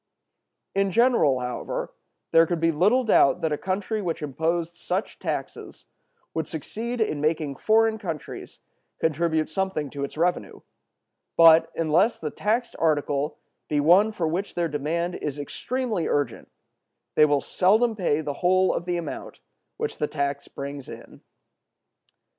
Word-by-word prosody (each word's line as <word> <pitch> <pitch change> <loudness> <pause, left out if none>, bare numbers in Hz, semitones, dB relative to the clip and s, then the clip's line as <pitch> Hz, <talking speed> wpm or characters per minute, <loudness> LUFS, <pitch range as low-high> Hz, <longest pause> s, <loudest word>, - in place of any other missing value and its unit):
In 195 0 +1
general, 210 - +3
however, 125 0 -4 0.4
there 165 0 +6
could 175 -1 -1
be 165 +1 +3
little 205 +11 +3
doubt 215 - +4
that 160 - 0
a - - +2
country 200 +3 -2
which 170 -4 -3
imposed 165 +4 -1
such 180 +3 -4
taxes - - -5 0.5
would 160 -2 -2
succeed 225 - -5
in 155 -10 0
making 155 -2 0
foreign 220 0 +3
countries 165 -7 -7 0.4
contribute 160 0 +1
something 160 -5 -2
to 140 -1 -5
its 140 - -6
revenue; 175 +2 -1 0.8
but, 165 -1 +7
unless 165 +8 +2
the 150 -2 -5
taxed 230 +3 -1
article 145 -2 0 0.3
be 150 - +1
one 180 +9 +5
for 175 -6 -2
which 180 +6 -3
their 175 -1 +1
demand 165 +4 -2
is 145 -1 -4
extremely 230 - -3
urgent, 145 -1 -1 0.6
they - - +5
will 145 -1 +2
seldom 220 +5 +2
pay 165 -6 0
the 145 -2 -3
whole 185 +1 +3
of 170 - -3
the 175 -1 -1
amount 170 - -6 0.4
which 450 -1 -4
the 150 - 0
tax 140 -1 -3
brings 140 -1 -7
in. - - -11
165 Hz, 145 wpm, -25 LUFS, 150-195 Hz, 0.8 s, but